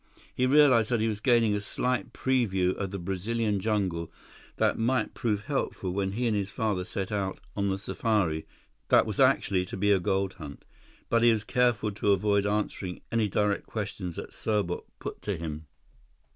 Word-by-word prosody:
He 125 Hz, -, +1 dB
realized 130 Hz, -6 st, +5 dB
that 120 Hz, -2 st, +1 dB
he 110 Hz, -, +1 dB
was 110 Hz, -2 st, -2 dB
gaining 115 Hz, -2 st, +3 dB
a 105 Hz, -, -1 dB
slight 125 Hz, +1 st, -1 dB
preview 95 Hz, -9 st, +1 dB
of 100 Hz, -, -3 dB
the 100 Hz, -, -5 dB
Brazilian 100 Hz, +4 st, -1 dB
jungle 95 Hz, -6 st, -1 dB, 0.4 s
that -, -, +2 dB
might 125 Hz, +3 st, +1 dB
prove 105 Hz, -3 st, -1 dB
helpful 120 Hz, -8 st, -2 dB
when 95 Hz, +1 st, -1 dB
he 120 Hz, +4 st, -1 dB
and 115 Hz, -3 st, +2 dB
his 100 Hz, -1 st, -1 dB
father 105 Hz, -5 st, -1 dB
set 95 Hz, +1 st, -4 dB
out 100 Hz, -2 st, -2 dB, 0.2 s
on 100 Hz, -1 st, 0 dB
the 95 Hz, -, 0 dB
safari 95 Hz, -6 st, -1 dB, 0.4 s
that -, -, +5 dB
was -, -, -4 dB
actually 90 Hz, -2 st, +3 dB
to 95 Hz, -, -7 dB
be 105 Hz, +2 st, +2 dB
a 100 Hz, -, +4 dB
gold 95 Hz, +1 st, 0 dB
hunt. 75 Hz, -7 st, -10 dB, 0.4 s
But 115 Hz, -, +2 dB
he 120 Hz, 0 st, +6 dB
was 110 Hz, -2 st, 0 dB
careful 115 Hz, -2 st, +1 dB
to 100 Hz, 0 st, +2 dB
avoid 100 Hz, +1 st, +2 dB
answering 100 Hz, -3 st, -2 dB
any 115 Hz, -3 st, +1 dB
direct 105 Hz, +1 st, 0 dB
questions 100 Hz, -5 st, -4 dB
that -, -, -7 dB
Serbot 105 Hz, -5 st, -1 dB
put -, -, -7 dB
to 100 Hz, -3 st, -2 dB
him. 80 Hz, -1 st, -6 dB
105 Hz, 185 wpm, -28 LUFS, 95-115 Hz, 0.4 s, he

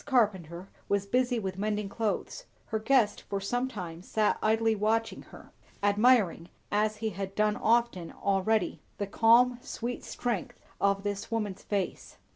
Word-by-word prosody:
Carpenter 190 Hz, -, 0 dB, 0.2 s
was 200 Hz, 0 st, +1 dB
busy 245 Hz, +3 st, +1 dB
with 190 Hz, -3 st, -4 dB
mending 210 Hz, 0 st, -1 dB
clothes; 225 Hz, -, -3 dB, 0.2 s
her 220 Hz, -, -1 dB
guest 220 Hz, -2 st, +2 dB
for 200 Hz, -, -4 dB
some 245 Hz, +6 st, -1 dB
time 175 Hz, -9 st, -7 dB
sat 210 Hz, +3 st, +1 dB
idly 225 Hz, +1 st, +3 dB
watching 220 Hz, +2 st, 0 dB
her; -, -, -14 dB, 0.3 s
admiring, 205 Hz, -5 st, +3 dB, 0.2 s
as 215 Hz, +1 st, +1 dB
he 220 Hz, -, 0 dB
had 195 Hz, 0 st, -5 dB
done 210 Hz, 0 st, +2 dB
often 230 Hz, -7 st, +1 dB
already, 200 Hz, 0 st, 0 dB, 0.2 s
the 200 Hz, -, -1 dB
calm, 235 Hz, +4 st, +4 dB
sweet 245 Hz, -2 st, -5 dB
strength 235 Hz, -7 st, -3 dB, 0.2 s
of 200 Hz, 0 st, +2 dB
this 205 Hz, -1 st, -3 dB
woman's 210 Hz, -4 st, -2 dB
face. 200 Hz, -3 st, -3 dB
210 Hz, 145 wpm, -29 LUFS, 195-230 Hz, 0.3 s, calm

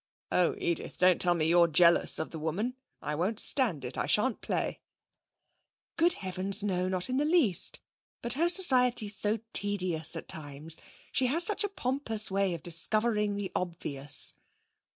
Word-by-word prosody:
'Oh, 180 Hz, -1 st, +1 dB
Edith, 170 Hz, -, -4 dB
don't 180 Hz, -1 st, +3 dB
tell 175 Hz, -1 st, +3 dB
me 160 Hz, -2 st, -1 dB
you're 170 Hz, +1 st, +4 dB
jealous 170 Hz, +2 st, +3 dB
of 160 Hz, -, -5 dB
the 160 Hz, -, -8 dB
woman! 195 Hz, +11 st, -4 dB, 0.3 s
I 150 Hz, -, -3 dB
won't 190 Hz, +8 st, -2 dB
stand 190 Hz, -, +2 dB
it! 125 Hz, -, -7 dB
I -, -, -2 dB
shan't 235 Hz, +2 st, 0 dB
play.' -, -, -3 dB, 1.2 s
'Good 340 Hz, +1 st, +2 dB
heavens, 190 Hz, +2 st, 0 dB
no! 185 Hz, -3 st, -2 dB
Not 185 Hz, -1 st, -2 dB
in 255 Hz, 0 st, -3 dB
the 285 Hz, -, +1 dB
least. 300 Hz, -, +3 dB, 0.4 s
But 235 Hz, -1 st, +1 dB
her 330 Hz, +6 st, 0 dB
society's 250 Hz, -, +4 dB
so 215 Hz, +1 st, -1 dB
tedious 180 Hz, -6 st, -1 dB
at 165 Hz, -, -8 dB
times. 150 Hz, +1 st, -4 dB, 0.3 s
She 260 Hz, -, +1 dB
has 320 Hz, +7 st, 0 dB
such 420 Hz, +1 st, +1 dB
a 410 Hz, -, -2 dB
pompous 250 Hz, -, -1 dB
way 195 Hz, -2 st, 0 dB
of 165 Hz, -, -11 dB
discovering 210 Hz, +5 st, 0 dB
the 200 Hz, -2 st, -5 dB
obvious.' 150 Hz, -6 st, +2 dB
195 Hz, 165 wpm, -28 LUFS, 170-245 Hz, 1.2 s, you're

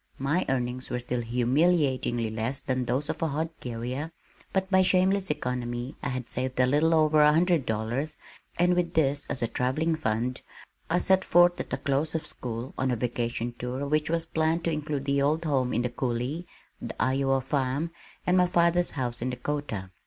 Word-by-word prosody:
My 145 Hz, +7 st, 0 dB
earnings 125 Hz, -1 st, -2 dB
were -, -, -1 dB
still 125 Hz, 0 st, -2 dB
humiliatingly 125 Hz, -1 st, +1 dB
less 115 Hz, +5 st, -1 dB
than 130 Hz, -2 st, -2 dB
those 130 Hz, +5 st, 0 dB
of -, -, -4 dB
a 165 Hz, -, +2 dB
hod 160 Hz, +3 st, -2 dB
carrier, 125 Hz, +6 st, -4 dB, 0.4 s
but 190 Hz, 0 st, 0 dB
by 190 Hz, -1 st, +6 dB
shameless 190 Hz, +1 st, +3 dB
economy 125 Hz, -2 st, -3 dB
I -, -, -2 dB
had 125 Hz, -1 st, -4 dB
saved 130 Hz, 0 st, -1 dB
a 125 Hz, -, +6 dB
little 150 Hz, +5 st, +3 dB
over 155 Hz, -1 st, +4 dB
one 150 Hz, 0 st, +7 dB
hundred 165 Hz, -2 st, +2 dB
dollars 115 Hz, +8 st, -2 dB, 0.4 s
and 180 Hz, +1 st, +4 dB
with 175 Hz, -1 st, -1 dB
this 145 Hz, -2 st, +1 dB
as 125 Hz, -, -1 dB
a -, -, +2 dB
travelling 155 Hz, +8 st, 0 dB
fund, 125 Hz, -3 st, -1 dB, 0.5 s
I 170 Hz, -, +2 dB
set 190 Hz, +1 st, +3 dB
forth 175 Hz, 0 st, +4 dB
at -, -, -4 dB
the -, -, -1 dB
close 145 Hz, +3 st, 0 dB
of 160 Hz, -, -2 dB
school, 120 Hz, +1 st, -4 dB
on 130 Hz, -, +1 dB
a 125 Hz, -, +1 dB
vacation 120 Hz, 0 st, -2 dB
tour 125 Hz, +3 st, -3 dB
which 150 Hz, +1 st, +1 dB
was 165 Hz, 0 st, 0 dB
planned 160 Hz, +1 st, 0 dB
to 170 Hz, -, 0 dB
include 150 Hz, -2 st, -3 dB
the 140 Hz, 0 st, +1 dB
old 155 Hz, +4 st, +1 dB
home 130 Hz, -5 st, +1 dB
in 120 Hz, -, 0 dB
the 125 Hz, -, 0 dB
Coulee, 125 Hz, +7 st, -2 dB, 0.3 s
the -, -, -7 dB
Iowa 135 Hz, 0 st, +2 dB
farm, 135 Hz, +4 st, -1 dB, 0.3 s
and 180 Hz, -, +3 dB
my 180 Hz, -1 st, +5 dB
father's 175 Hz, 0 st, +3 dB
house 120 Hz, -3 st, -2 dB
in 125 Hz, -, -1 dB
Dakota. 125 Hz, -7 st, -4 dB
140 Hz, 190 wpm, -27 LUFS, 125-160 Hz, 0.5 s, one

